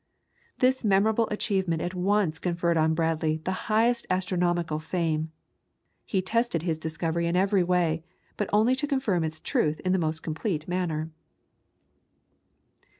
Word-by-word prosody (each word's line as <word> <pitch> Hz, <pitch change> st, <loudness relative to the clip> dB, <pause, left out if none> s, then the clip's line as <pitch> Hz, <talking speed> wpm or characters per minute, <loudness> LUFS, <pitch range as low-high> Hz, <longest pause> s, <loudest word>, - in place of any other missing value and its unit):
This 260 Hz, 0 st, +2 dB
memorable 215 Hz, +2 st, +3 dB
achievement 190 Hz, -5 st, 0 dB
at 175 Hz, +3 st, -3 dB
once 185 Hz, -3 st, +1 dB
conferred 170 Hz, -1 st, 0 dB
on 160 Hz, 0 st, +2 dB
Bradley 160 Hz, -1 st, 0 dB
the 185 Hz, +5 st, -4 dB
highest 235 Hz, +2 st, +2 dB
astronomical 175 Hz, -3 st, 0 dB
fame. 160 Hz, -1 st, -1 dB, 0.8 s
He 190 Hz, -3 st, 0 dB
tested 230 Hz, -4 st, 0 dB
his 165 Hz, -3 st, -1 dB
discovery 160 Hz, +1 st, -2 dB
in 170 Hz, -, 0 dB
every 195 Hz, +1 st, +3 dB
way, 170 Hz, -3 st, +1 dB, 0.3 s
but 210 Hz, -, -2 dB
only 220 Hz, +5 st, +4 dB
to 290 Hz, -, 0 dB
confirm 265 Hz, -, 0 dB
its 155 Hz, 0 st, -3 dB
truth 150 Hz, 0 st, 0 dB
in 185 Hz, -, 0 dB
the 190 Hz, -, +2 dB
most 160 Hz, -1 st, -2 dB
complete 160 Hz, 0 st, -3 dB
manner. 165 Hz, -3 st, -2 dB
175 Hz, 140 wpm, -27 LUFS, 160-200 Hz, 0.8 s, only